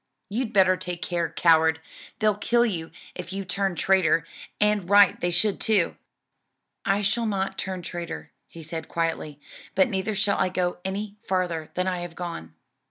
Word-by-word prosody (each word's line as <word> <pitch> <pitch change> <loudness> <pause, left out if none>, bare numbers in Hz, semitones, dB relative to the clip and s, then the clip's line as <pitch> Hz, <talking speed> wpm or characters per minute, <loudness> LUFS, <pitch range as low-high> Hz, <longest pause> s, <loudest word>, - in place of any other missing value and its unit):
"You'd 230 +2 -2
better 190 -3 +5
take 180 -1 -5
care, 170 -2 -1
coward, 160 -1 +4 0.4
they'll 215 -1 +3
kill 235 +4 +2
you 170 -8 -3 0.2
if 180 -1 -7
you 195 0 -4
turn 190 0 -1
traitor; 170 -4 +3 0.3
and 210 -3 +2
right 205 -1 +6
they 175 - +1
should 195 +4 +1
too." 205 -6 +2 0.9
"I 200 +1 +1
shall 230 +3 +1
not 195 -2 -1
turn 185 -2 -3
traitor," 170 0 -6 0.2
he 165 - -11
said 160 0 -6
quietly, 165 -3 -2 0.4
"but 280 -3 +4
neither 195 0 -1
shall 200 0 +1
I - - +2
go 180 -1 -1
any 200 +2 -4
farther 175 -4 -1
than 180 - 0
I 185 -1 -1
have 175 -1 -7
gone. 85 - -6
185 Hz, 165 wpm, -25 LUFS, 170-200 Hz, 0.9 s, right